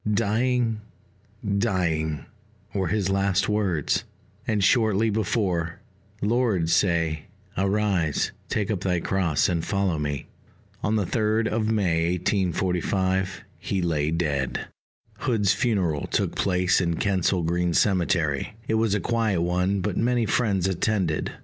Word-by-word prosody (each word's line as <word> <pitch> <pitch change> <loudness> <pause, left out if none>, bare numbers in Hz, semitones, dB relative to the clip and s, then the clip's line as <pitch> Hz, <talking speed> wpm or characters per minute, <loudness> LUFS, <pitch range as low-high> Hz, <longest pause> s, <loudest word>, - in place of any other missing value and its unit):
"Dying, 115 +1 +1 0.8
dying," 80 -8 0 0.5
were 95 -2 0
his 95 +1 0
last 95 0 +1
words; 100 -8 0 0.4
and 105 -3 +1
shortly 110 0 +3
before, 95 -5 -1 0.4
"Lord, 105 -7 +1
say 85 -4 +1 0.3
'Arise, 95 -5 +1 0.2
take 105 +1 -1
up 100 - -1
thy 90 -2 0
cross, 85 -4 +1
and 85 -2 -1
follow 100 -5 0
me.'" 75 -1 -3 0.6
On 110 - 0
the 105 -3 +1
3d 110 +3 +1
of 110 0 0
May 85 -5 +1
1845 95 +1 0 0.2
he 95 - -2
lay 75 -3 0
dead. 75 -5 -1 0.5
Hood's 105 -6 +2
funeral 90 - 0
took - - 0
place 90 0 +2
in 85 -2 0
Kensal 95 -1 +1
Green 85 +1 0
Cemetery: 85 -4 +1
it - - 0
was 110 -3 +2
a - - +1
quiet 110 -3 0
one, 90 +3 0
but 100 -1 -2
many 120 -1 +2
friends 100 -5 +1
attended. 95 -3 0
95 Hz, 125 wpm, -25 LUFS, 85-105 Hz, 0.8 s, shortly